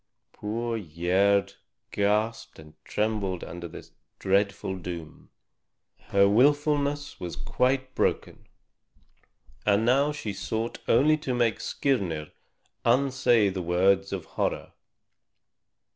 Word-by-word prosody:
Poor 115 Hz, +2 st, -3 dB
Gerd 95 Hz, +3 st, +1 dB, 0.4 s
gasped 105 Hz, +3 st, 0 dB
and 75 Hz, 0 st, -14 dB
trembled 105 Hz, -4 st, -2 dB
under 85 Hz, +1 st, -7 dB
this -, -, -12 dB, 0.3 s
dreadful 100 Hz, 0 st, 0 dB
doom. 85 Hz, -3 st, -8 dB, 0.8 s
Her 100 Hz, 0 st, +4 dB
willfulness 145 Hz, +5 st, +2 dB
was 90 Hz, -4 st, -5 dB
quite 130 Hz, -, 0 dB
broken, -, -, -1 dB, 1.2 s
and 105 Hz, +2 st, +2 dB
now 140 Hz, +5 st, +3 dB
she 130 Hz, -9 st, -5 dB
sought 110 Hz, +4 st, -3 dB
only 150 Hz, +6 st, +4 dB
to 130 Hz, -5 st, -3 dB
make 120 Hz, -3 st, +1 dB
Skirnir 90 Hz, -, -1 dB, 0.5 s
unsay 120 Hz, -4 st, +3 dB
the 95 Hz, -1 st, -4 dB
words 95 Hz, +3 st, +2 dB
of 95 Hz, -4 st, -4 dB
horror. -, -, -3 dB
105 Hz, 100 wpm, -27 LUFS, 95-125 Hz, 1.2 s, Her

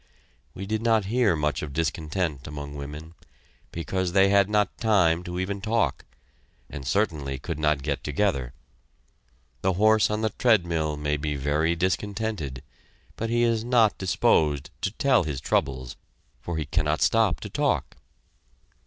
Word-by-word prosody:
we 95 Hz, -, -6 dB
did 110 Hz, +2 st, -2 dB
not 115 Hz, -3 st, +2 dB
hear 120 Hz, -8 st, +3 dB
much 75 Hz, -1 st, -1 dB
of 75 Hz, -2 st, -6 dB
discontent 80 Hz, -1 st, -2 dB
among 70 Hz, -1 st, -7 dB
women, 75 Hz, +3 st, -8 dB, 0.6 s
because 90 Hz, +1 st, -2 dB
they 95 Hz, 0 st, +5 dB
had 100 Hz, 0 st, +4 dB
not 105 Hz, -2 st, +1 dB
time 90 Hz, -7 st, +3 dB
to 90 Hz, 0 st, -5 dB
even 100 Hz, +1 st, -3 dB
talk, 110 Hz, -, 0 dB, 0.7 s
and 70 Hz, -2 st, -7 dB
certainly 75 Hz, -7 st, 0 dB
could 80 Hz, +4 st, -5 dB
not 75 Hz, -3 st, +1 dB
get -, -, -2 dB
together. 75 Hz, -5 st, 0 dB, 1.1 s
The 95 Hz, 0 st, +1 dB
horse 110 Hz, +3 st, +4 dB
on 105 Hz, +1 st, -1 dB
the 110 Hz, -1 st, 0 dB
treadmill 85 Hz, -10 st, +1 dB
may 75 Hz, 0 st, -1 dB
be 75 Hz, 0 st, -2 dB
very 75 Hz, +4 st, +1 dB
discontented, 95 Hz, -, -2 dB, 0.5 s
but 115 Hz, -, -3 dB
he 120 Hz, +1 st, +2 dB
is 115 Hz, -2 st, +1 dB
not 120 Hz, -3 st, +3 dB
disposed 75 Hz, -5 st, +1 dB
to 100 Hz, -, 0 dB
tell 130 Hz, +1 st, +2 dB
his 75 Hz, -4 st, -3 dB
troubles, 65 Hz, -2 st, -1 dB, 0.5 s
for 85 Hz, -2 st, -4 dB
he 80 Hz, -, -2 dB
cannot 75 Hz, +2 st, 0 dB
stop 110 Hz, -8 st, +3 dB
to -, -, -6 dB
talk. -, -, 0 dB
85 Hz, 150 wpm, -26 LUFS, 75-105 Hz, 1.1 s, they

